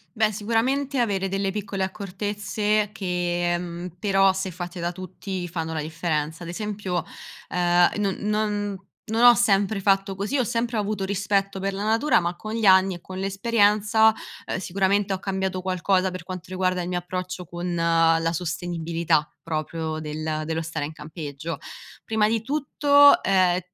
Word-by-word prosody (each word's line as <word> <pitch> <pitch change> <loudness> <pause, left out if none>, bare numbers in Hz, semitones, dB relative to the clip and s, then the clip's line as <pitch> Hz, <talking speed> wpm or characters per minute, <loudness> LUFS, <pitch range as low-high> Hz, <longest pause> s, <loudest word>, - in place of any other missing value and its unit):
Beh, 215 -1 +2
sicuramente 250 +6 0
avere 200 -5 +1
delle 195 +1 -1
piccole 195 -1 -3
accortezze 205 +2 -1
che, 175 -3 -1
mhmm, 175 0 -6
però 195 0 +4
se 190 0 -3
fatte 175 +1 -7
da 170 0 -1
tutti 185 0 -6
fanno 160 -1 -4
la 155 - -2
differenza. 160 0 -2
Ad 170 - -7
esempio, 195 -4 -3 0.5
ehm, 175 0 +4
no 200 -2 0 0.3
no 205 -2 -3 0.2
non 225 +2 -1
ho 245 - +10
sempre 205 -3 +2
fatto 195 0 +2
così, 205 +9 -1
ho 255 - +2
sempre 230 +1 -1
avuto 205 -1 -1
rispetto 195 0 0
per 195 +1 -2
la 200 - -3
natura, 225 +8 +3
ma 175 +1 -2
con 215 0 -6
gli 225 0 -2
anni 190 0 +6
e 175 - -9
con 185 0 -9
l'esperienza, 210 +2 +3 0.3
ehm, - - -3
sicuramente 195 +2 +1
ho 190 - -3
cambiato 190 -1 -2
qualcosa 185 0 +1
per 185 -1 -7
quanto 185 -1 -7
riguarda 185 -1 0
il 175 - -5
mio 180 -1 -1
approccio 180 +1 -5
con 175 +1 -4
la 165 -1 +3
la 165 +1 0
sostenibilità, 165 -2 -1
proprio 160 0 -3
del 155 0 -3
dello 160 0 -2
stare 160 -2 -3
in 155 - -7
campeggio. 155 0 -6 0.5
Prima 220 -1 +2
di 225 0 0
tutto, 285 +1 +5
ehm, 185 -2 +3
190 Hz, 165 wpm, -24 LUFS, 175-205 Hz, 0.5 s, ho